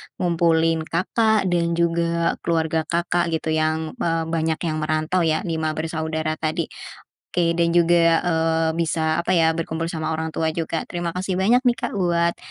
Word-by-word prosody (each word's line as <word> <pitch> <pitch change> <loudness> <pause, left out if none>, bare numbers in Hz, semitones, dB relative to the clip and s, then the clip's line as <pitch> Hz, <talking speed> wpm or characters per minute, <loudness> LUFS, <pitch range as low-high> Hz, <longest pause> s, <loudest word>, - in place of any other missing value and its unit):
ngumpulin 165 -2 +1
Kakak 215 +5 +1
dan 170 -1 +1
juga 170 0 0
keluarga 160 -1 -1
Kakak, 175 0 0
gitu. 160 0 -2
Yang 155 0 0
eee, 165 -5 0
banyak 160 -1 -1
yang 155 -2 -1
merantau, 155 +3 0
ya 155 +4 0
5 160 -3 -2
bersaudara 160 0 -3
tadi. 160 +1 -2 0.6
Oke, 170 -1 +1
dan 170 0 +2
juga, 170 -1 +4
eee, 165 -1 +1
bisa, 160 -1 0
apa 180 +2 0
ya, 165 -2 +4
berkumpul 165 0 -3
sama 160 -1 -3
orang 160 0 -3
tua 160 0 -1
juga. 165 0 -3
Terima 175 -1 -3
kasih 185 +2 -3
banyak 245 +6 +3
nih, 245 - +5
Kak, - - -4
buat 170 -2 +1
165 Hz, 165 wpm, -22 LUFS, 160-170 Hz, 0.6 s, nih